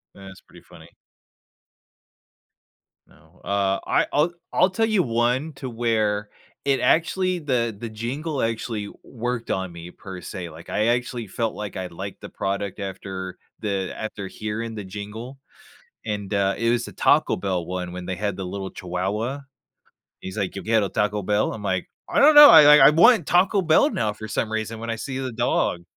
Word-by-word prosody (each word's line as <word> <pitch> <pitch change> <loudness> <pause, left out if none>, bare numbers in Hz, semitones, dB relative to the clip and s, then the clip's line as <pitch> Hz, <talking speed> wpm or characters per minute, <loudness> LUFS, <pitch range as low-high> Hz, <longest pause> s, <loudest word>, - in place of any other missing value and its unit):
That's 95 -1 -12
pretty - - -18
funny. - - -16 2.2
No, - - -24
uh, 100 -1 0
I - - +2
I'll 150 +4 +2 0.2
I'll 185 - +4
tell 210 +4 +1
you 215 -4 +2
one 125 +5 0
to 135 -1 -7
where 110 -3 0 0.4
it 135 -1 +2
actually 180 +5 +1
the 125 -7 -1
the 115 +2 -6
jingle 130 +7 -4
actually 115 -2 -2
worked 120 0 -4
on 95 -1 -2
me 85 +1 -10
per 95 -1 -10
se, 90 0 -7
like, 80 +1 -13
I 110 - +1
actually 120 -1 -1
felt 115 +3 -2
like 105 -2 -6
I 95 -1 -4
liked 95 +3 -8
the - - -8
product 100 0 -3
after 95 -1 -6 0.2
the 100 -3 -2
after 105 -3 -5
hearing 110 +3 -5
the 105 - -5
jingle; 105 +7 -8 0.7
and 105 -2 -4
uh, 100 -1 +2
it 115 0 +1
was 120 0 +1
the - - -9
Taco - - +3
Bell 90 -2 -2
one 90 0 -5
when 90 0 -7
they 95 - -3
had 100 0 -2
the 95 - -5
little 95 +1 -5
chihuahua. 100 +9 -3 0.8
He's 95 - -7
like, 100 -3 -2
“Yo 95 - -5
Quiero 110 -3 +2
Taco 105 0 -1
Bell?" 105 +2 +1
I'm 110 - -7
like, 95 -3 -2 0.2
"I - - +1
don't 300 +2 +7
know." 295 0 +12
I - - +10
I 135 - +8
I - - +9
want 175 +3 +5
Taco 190 +2 +3
Bell 160 -2 +4
now 110 -2 -1
for 110 +1 -9
some 110 +1 -2
reason 110 0 -3
when 115 0 -4
I 115 - -2
see 130 +4 -5
the 130 -2 -4
dog. 110 -6 0
110 Hz, 185 wpm, -23 LUFS, 95-125 Hz, 2.2 s, know